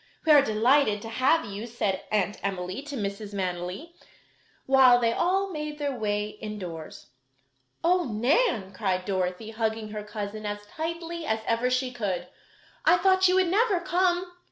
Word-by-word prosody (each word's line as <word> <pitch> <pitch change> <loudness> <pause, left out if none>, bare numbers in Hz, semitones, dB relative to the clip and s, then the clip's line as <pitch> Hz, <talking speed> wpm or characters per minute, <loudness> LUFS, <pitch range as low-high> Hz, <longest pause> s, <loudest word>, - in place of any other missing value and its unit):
"We 315 - +5
are 295 -2 +9
delighted 225 -1 +3
to 225 - -6
have 260 +8 +2
you," 205 +3 -6
said 210 -5 -2
Aunt 205 -1 0
Emily 185 +2 -3
to 290 0 -7
Mrs. 200 0 -4
Manily, 185 - -4 0.7
while 260 -2 +6
they 230 -1 +2
all 385 +5 +1
made 300 -2 -5
their 285 -2 -2
way 210 -2 -1
indoors. 180 -10 -7 0.7
"Oh, 355 +1 +3
Nan!" 235 - +1
cried 185 -2 -1
Dorothy, 185 +2 -2
hugging 220 -1 -2
her 210 0 -5
cousin 210 0 -6
as 205 0 -5
tightly 335 +5 -5
as 220 0 0
ever 230 +2 +1
she 255 0 0
could, 195 -7 -3 0.6
"I 345 +2 +5
thought 375 +1 +4
you 365 - +3
would 375 -2 +3
never 410 0 +2
come!" 360 0 +1
230 Hz, 155 wpm, -27 LUFS, 205-320 Hz, 0.7 s, are